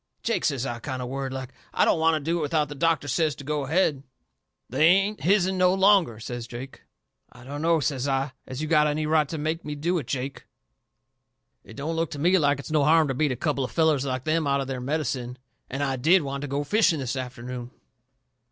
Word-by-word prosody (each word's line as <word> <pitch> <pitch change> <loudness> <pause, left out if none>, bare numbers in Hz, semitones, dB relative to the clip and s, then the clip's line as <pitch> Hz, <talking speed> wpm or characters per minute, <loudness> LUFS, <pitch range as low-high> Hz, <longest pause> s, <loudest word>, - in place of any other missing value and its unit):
"Jake," 230 - 0
says 135 -4 0
I, 120 -2 -4
kind 130 +2 -5
of 125 -1 -4
worried 135 0 -3
like, 130 -1 -6 0.2
"I - - +4
don't - - +2
want 160 0 +3
to - - 0
do 165 +4 -1
it - - -2
without 150 -1 0
that 145 -2 -8
doctor 165 -3 +1
says 155 +1 +1
to 140 - -10
go 145 0 -2
ahead." 155 -2 +1 0.7
"They 155 - +3
ain't 195 +4 +3
his'n 190 0 +2
no 185 0 +4
longer," 190 - +4
says 120 +1 -6
Jake. 125 +3 -9 0.5
"I 120 - -15
dunno," 155 +5 0
says 135 -1 -1
I, 135 0 0 0.2
"as 130 +4 -5
you - - -2
got 150 -1 +4
any 150 +1 -1
right 155 -2 +2
to 160 - -4
make 155 +2 -2
me 150 0 -5
do 170 +4 0
it, 135 - -8
Jake. 135 0 -4 1.2
It 110 - -13
don't 155 +4 -3
look 165 0 0
to 145 - -7
me 180 +5 +4
like 145 -2 +2
it's 140 +2 -8
no 155 -2 +3
harm 155 0 +4
to - - 0
beat 145 +2 +1
a - - -1
couple 140 0 -1
of 125 - -3
fellers 155 -1 +2
like 130 -2 -3
them 155 0 0
out 140 0 +2
of 135 - -2
their 130 -1 -4
medicine. 130 -3 -2 0.3
And 135 +2 -2
I 135 -1 -1
DID 165 +7 +4
want 140 0 -4
to 145 - -4
go 140 +1 -2
fishing 205 0 +3
this 130 -2 -3
afternoon." 125 -1 -6
145 Hz, 235 wpm, -25 LUFS, 130-160 Hz, 1.2 s, I